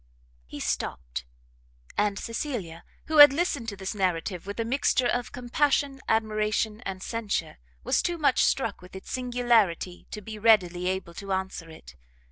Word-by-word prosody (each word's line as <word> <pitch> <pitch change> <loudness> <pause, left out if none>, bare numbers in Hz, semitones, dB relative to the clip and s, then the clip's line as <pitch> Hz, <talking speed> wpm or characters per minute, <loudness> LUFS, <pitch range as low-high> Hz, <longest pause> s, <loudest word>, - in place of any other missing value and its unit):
He - - -8
stopt; 60 0 -3 0.7
and 205 -1 +1
Cecilia, 225 - -4 0.2
who 315 -1 -1
had 290 -1 +11
listened 285 -6 -1
to 200 - -6
this 190 +1 -4
narrative 185 -2 -2
with 200 +3 -6
a 230 - 0
mixture 255 +1 +1
of 245 0 0
compassion, 270 +2 0
admiration 215 0 0
and 190 -1 -5
censure, 205 -8 -3 0.2
was - - +2
too 345 -1 -1
much 285 -5 +3
struck 230 -8 0
with 180 +1 -14
its 190 - -9
singularity 240 -8 +1
to 210 - -6
be 215 +1 -8
readily 180 -5 +3
able 185 -2 -2
to 195 +3 -7
answer 190 -3 -4
it. 160 - -13
210 Hz, 155 wpm, -27 LUFS, 185-245 Hz, 0.7 s, had